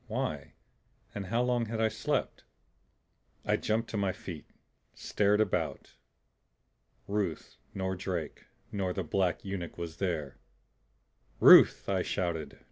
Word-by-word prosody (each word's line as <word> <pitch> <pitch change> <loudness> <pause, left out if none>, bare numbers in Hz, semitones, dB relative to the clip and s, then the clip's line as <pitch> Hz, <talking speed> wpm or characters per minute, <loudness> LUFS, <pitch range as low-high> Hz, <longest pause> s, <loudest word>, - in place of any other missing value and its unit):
Why? 110 - -3 0.6
And 100 -2 -5
how 115 +5 +1
long 120 -2 0
had 110 0 -4
I 110 0 +3
slept? - - -2 1.0
I - - +2
jumped 115 +2 -1
to 110 - -2
my 100 -2 +1
feet, 85 -4 -9 0.5
stared 105 0 +1
about. 110 - -1 1.1
Ruth 95 -11 -3 0.2
nor 95 -1 -2
Drake 90 -4 -5 0.3
nor 95 -3 -1
the 95 - -2
black 90 +3 0
eunuch 95 -4 -5
was 85 -1 -6
there! 75 -9 -3 1.0
"Ruth!" - - +8
I 95 -2 +1
shouted. 85 -5 -3
95 Hz, 125 wpm, -30 LUFS, 85-105 Hz, 1.1 s, Ruth